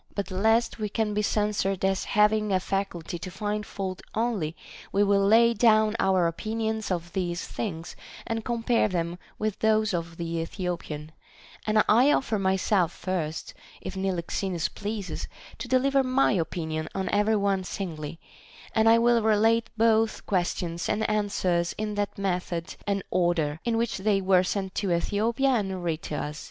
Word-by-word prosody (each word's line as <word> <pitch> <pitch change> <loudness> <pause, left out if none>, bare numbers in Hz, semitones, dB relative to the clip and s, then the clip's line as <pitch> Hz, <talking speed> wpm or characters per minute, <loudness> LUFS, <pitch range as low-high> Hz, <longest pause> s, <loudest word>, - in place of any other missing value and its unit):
But 200 -1 -3
lest 220 +5 +2
we 210 -1 -2
be 210 -1 0
censured 205 -2 0
as 190 0 0
having 210 0 +3
a 190 - +3
faculty 180 -3 -3
to 185 - -6
find 210 +3 -3
fault 190 -2 -5
only, 215 -9 -1 0.4
we 200 - +3
will 200 -1 +3
lay 230 +3 +5
down 215 -1 +4
our 190 -2 +3
opinions 220 +5 -2
of 175 -2 -3
these 175 -2 -2
things, 170 -6 -5 0.3
and 225 -1 -3
compare 235 -1 +1
them 175 -2 -2 0.2
with 215 -2 -2
those 215 -2 +2
of 170 -1 -3
the 170 0 -3
Ethiopian; 165 -3 -4 0.6
and 215 0 +4
I 245 +7 +5
offer 225 -7 +1
myself 190 -2 +2
first, 170 -4 -4 0.3
if 185 - -7
Niloxenus 185 -1 -1
pleases, 205 -1 -5 0.3
to - - -5
deliver 270 +1 +3
my 260 +1 +2
opinion 160 -4 -2
on 190 -1 -1
every 210 +2 +2
one 200 -2 +1
singly, 165 -5 -5 0.5
and 220 0 +4
I 230 - +7
will 235 0 +4
relate 220 +1 +3
both 225 0 +2
questions 175 -2 -1
and 220 +1 +1
answers 190 -5 0
in 215 0 -2
that 205 -1 -2
method 180 -3 -2
and 200 -1 0
order 165 -4 +1
in 230 -1 0
which 230 -3 -1
they 200 0 +2
were 185 -1 +4
sent 190 0 -2
to 195 -3 -1
Ethiopia 225 +9 +1
and 195 -7 0
read 165 -2 -1
to 150 - -5
us. 150 +1 -4
200 Hz, 160 wpm, -27 LUFS, 175-220 Hz, 0.6 s, I